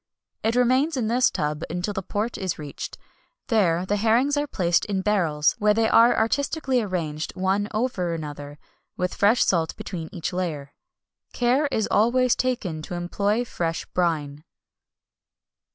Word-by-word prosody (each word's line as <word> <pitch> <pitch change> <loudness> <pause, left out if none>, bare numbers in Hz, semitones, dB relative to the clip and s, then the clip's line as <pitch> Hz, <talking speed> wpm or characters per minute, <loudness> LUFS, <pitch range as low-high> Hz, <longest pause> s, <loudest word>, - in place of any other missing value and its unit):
It 225 +2 0
remains 260 +5 +2
in 225 -4 0
this 250 +2 +3
tub 150 +1 -2
until 175 +5 -3
the 190 - -3
port 210 +5 -3
is 185 -3 -3
reached. 145 -2 -7 0.5
There 180 -6 +2
the 205 +2 0
herrings 235 +7 +2
are 290 0 0
placed 175 -9 +1
in 195 -2 -2
barrels, 170 -7 +2
where 210 0 +3
they 225 0 +2
are 230 +2 +5
artistically 265 +3 +1
arranged 165 -7 -3
one 190 +2 0
over 215 -6 -1
another, 145 -2 -7 0.4
with 180 0 -1
fresh 215 +4 +4
salt 165 -3 +1
between 165 -4 -6
each 170 0 -4
layer. 155 -6 -3 0.6
Care 255 +5 +2
is 220 -6 -1
always 245 +3 +3
taken 205 -11 -2
to 175 - -6
employ 200 +6 -1
fresh 165 -7 -3
brine. 155 -5 -1
200 Hz, 150 wpm, -24 LUFS, 165-235 Hz, 0.6 s, are